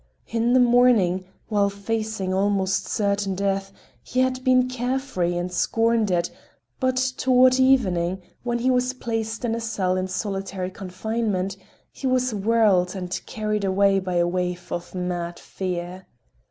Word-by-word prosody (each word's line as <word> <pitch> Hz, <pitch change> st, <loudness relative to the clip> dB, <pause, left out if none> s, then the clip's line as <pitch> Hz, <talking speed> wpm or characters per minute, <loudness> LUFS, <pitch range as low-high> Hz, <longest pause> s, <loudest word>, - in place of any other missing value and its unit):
In 230 Hz, +1 st, +1 dB
the 255 Hz, -, +6 dB
morning, 235 Hz, -7 st, +4 dB, 0.2 s
while 205 Hz, -2 st, +2 dB
facing 200 Hz, -1 st, -3 dB
almost 195 Hz, 0 st, +1 dB
certain 200 Hz, -2 st, 0 dB
death, 195 Hz, 0 st, -1 dB, 0.3 s
he 255 Hz, -, -1 dB
had 255 Hz, 0 st, 0 dB
been 255 Hz, -1 st, +4 dB
care 255 Hz, +1 st, -1 dB
free 180 Hz, -11 st, -2 dB
and 175 Hz, +1 st, -3 dB
had -, -, -6 dB
scorned 225 Hz, +2 st, +2 dB
it, 175 Hz, -1 st, 0 dB, 0.5 s
but 255 Hz, -1 st, +1 dB, 0.2 s
toward 255 Hz, 0 st, +4 dB
evening 190 Hz, -9 st, +3 dB, 0.2 s
when 240 Hz, -1 st, -1 dB
he 250 Hz, +2 st, +1 dB
was 250 Hz, 0 st, +1 dB
placed 225 Hz, -1 st, -3 dB
in 225 Hz, -, 0 dB
a 230 Hz, -, -2 dB
cell 190 Hz, -5 st, -1 dB
in 185 Hz, 0 st, -1 dB
solitary 195 Hz, -1 st, -3 dB
confinement, 195 Hz, 0 st, -2 dB, 0.4 s
he 270 Hz, -, -4 dB
was 255 Hz, -1 st, +1 dB
whirled 205 Hz, -3 st, +2 dB
and 180 Hz, -1 st, -4 dB
carried 215 Hz, -2 st, -2 dB
away 195 Hz, 0 st, +3 dB
by 185 Hz, -1 st, -3 dB
a 175 Hz, 0 st, +3 dB
wave 180 Hz, 0 st, -3 dB
of 175 Hz, +2 st, -5 dB
mad 175 Hz, -1 st, -3 dB
fear. 180 Hz, 0 st, -5 dB
200 Hz, 155 wpm, -24 LUFS, 185-235 Hz, 0.5 s, the